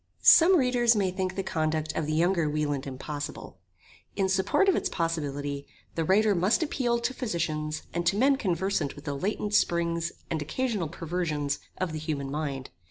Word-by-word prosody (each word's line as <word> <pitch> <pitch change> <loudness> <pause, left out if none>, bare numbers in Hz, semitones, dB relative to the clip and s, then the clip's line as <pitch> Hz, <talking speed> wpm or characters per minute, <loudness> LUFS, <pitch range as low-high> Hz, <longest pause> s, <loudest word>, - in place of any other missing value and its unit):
Some 360 +3 +8
readers 245 -4 +3
may 195 -3 +1
think 185 0 -2
the 195 - -2
conduct 155 -3 -1
of 155 - -1
the 155 - -1
younger 170 0 +2
Wieland 145 -2 -1
impossible. 145 +2 -6 0.6
In 195 -1 +1
support 190 - +2
of 385 - +4
its - - 0
possibility 145 -4 -3 0.3
the 165 - -1
Writer 205 +5 +4
must 190 - +2
appeal 245 -6 0
to 240 +2 -2
Physicians 155 - -2
and 170 +1 -1
to 195 - +2
men 275 +5 +4
conversant 185 - -1
with 145 - -12
the 145 - -2
latent 205 +7 -2
springs 170 -3 +1 0.2
and 160 -2 -1
occasional 210 - -1
perversions 160 -3 -2 0.2
of 185 -3 -2
the 155 - -3
human 145 -3 -3
mind. 140 -3 -4
170 Hz, 170 wpm, -28 LUFS, 150-200 Hz, 0.6 s, Some